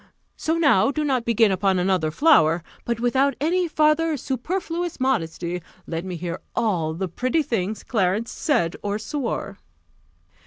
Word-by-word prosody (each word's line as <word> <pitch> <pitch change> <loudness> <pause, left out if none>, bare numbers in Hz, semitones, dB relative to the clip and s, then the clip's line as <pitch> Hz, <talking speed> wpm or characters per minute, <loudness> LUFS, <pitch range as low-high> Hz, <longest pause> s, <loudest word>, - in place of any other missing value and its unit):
So 320 +1 -1
now 275 - +4
do 300 +2 -1
not 260 -5 0
begin 225 -2 +3
upon 190 0 +1
another 180 -3 +1
flower; 165 - +4 0.2
but, 235 -1 -1
without 265 +3 +2
any 350 +5 +1
farther 310 0 +2
superfluous 335 +6 -3
modesty, 180 -8 -1 0.2
let 165 0 -4
me 185 -1 -5
hear 170 +1 -4 0.2
all 165 -8 0
the 190 +3 -2
pretty 255 - 0
things 215 -4 -2
Clarence 210 +1 0
said 230 - 0
or 205 0 -2
swore." 275 +2 -4
230 Hz, 145 wpm, -23 LUFS, 180-295 Hz, 0.2 s, now